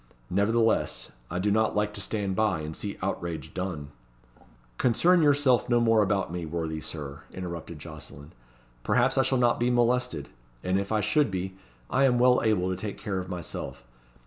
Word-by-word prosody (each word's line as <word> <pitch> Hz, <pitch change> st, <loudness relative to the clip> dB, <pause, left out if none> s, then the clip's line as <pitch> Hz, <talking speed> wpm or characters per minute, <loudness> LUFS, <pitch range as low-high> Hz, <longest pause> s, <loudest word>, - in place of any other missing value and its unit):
Nevertheless, 100 Hz, -, +1 dB, 0.2 s
I 90 Hz, -, -3 dB
do 100 Hz, +3 st, +1 dB
not 110 Hz, +1 st, +2 dB
like 105 Hz, 0 st, 0 dB
to 105 Hz, -, -7 dB
stand 100 Hz, -2 st, -2 dB
by, 110 Hz, -7 st, +1 dB
and 80 Hz, +1 st, -5 dB
see 100 Hz, -1 st, -4 dB
outrage 85 Hz, -4 st, -3 dB
done." 90 Hz, -6 st, -4 dB, 0.9 s
"Concern 170 Hz, +9 st, +4 dB
yourself 145 Hz, -5 st, +3 dB
no 120 Hz, -1 st, +4 dB
more 115 Hz, -2 st, +4 dB
about 100 Hz, -4 st, 0 dB
me, 90 Hz, -1 st, -3 dB
worthy 80 Hz, -1 st, -3 dB
Sir," 70 Hz, -3 st, -7 dB
interrupted 85 Hz, -3 st, -6 dB
Jocelyn. 75 Hz, -2 st, -10 dB, 0.5 s
"Perhaps 130 Hz, +2 st, +2 dB
I -, -, +7 dB
shall 135 Hz, 0 st, +1 dB
not 120 Hz, -1 st, +3 dB
be 120 Hz, +1 st, +2 dB
molested, 125 Hz, 0 st, +1 dB, 0.3 s
and 95 Hz, +1 st, +1 dB
if 100 Hz, +1 st, -4 dB
I 110 Hz, -1 st, +2 dB
should 150 Hz, +3 st, +2 dB
be, 95 Hz, 0 st, -4 dB, 0.3 s
I 135 Hz, -, +3 dB
am 125 Hz, -2 st, +3 dB
well 125 Hz, +1 st, +5 dB
able 105 Hz, -5 st, +2 dB
to -, -, -1 dB
take 100 Hz, +2 st, -5 dB
care 100 Hz, -2 st, -3 dB
of 90 Hz, 0 st, -6 dB
myself. 85 Hz, -7 st, -6 dB
100 Hz, 175 wpm, -27 LUFS, 85-120 Hz, 0.9 s, I